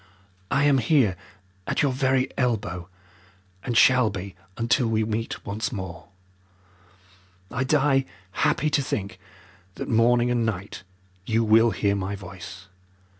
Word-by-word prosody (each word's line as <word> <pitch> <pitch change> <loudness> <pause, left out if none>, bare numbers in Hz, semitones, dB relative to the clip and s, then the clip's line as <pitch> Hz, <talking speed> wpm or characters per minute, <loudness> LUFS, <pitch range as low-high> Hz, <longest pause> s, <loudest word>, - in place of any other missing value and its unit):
"I 140 - +2
am 145 -2 +4
here 120 - +3 0.5
at - - 0
your 140 - +2
very 130 0 +1
elbow, 95 -8 -2 0.7
and 120 -2 -1
shall 125 -2 +5
be 100 -1 -6 0.2
until 120 +2 +2
we 110 -1 +1
meet 110 +1 -4
once 110 +7 -3
more. 95 -6 -7 1.4
I 125 +1 -1
die 135 -1 +2 0.3
happy 150 +9 +1
to 145 - +2
think 100 -7 -4 0.6
that - - -5
morning 120 +2 +3
and 120 -1 +1
night 100 -4 -4 0.5
you 115 +1 +2
will 115 +1 +5
hear 100 -2 0
my 100 +1 -3
voice. 95 -1 -10
115 Hz, 130 wpm, -25 LUFS, 100-130 Hz, 1.4 s, shall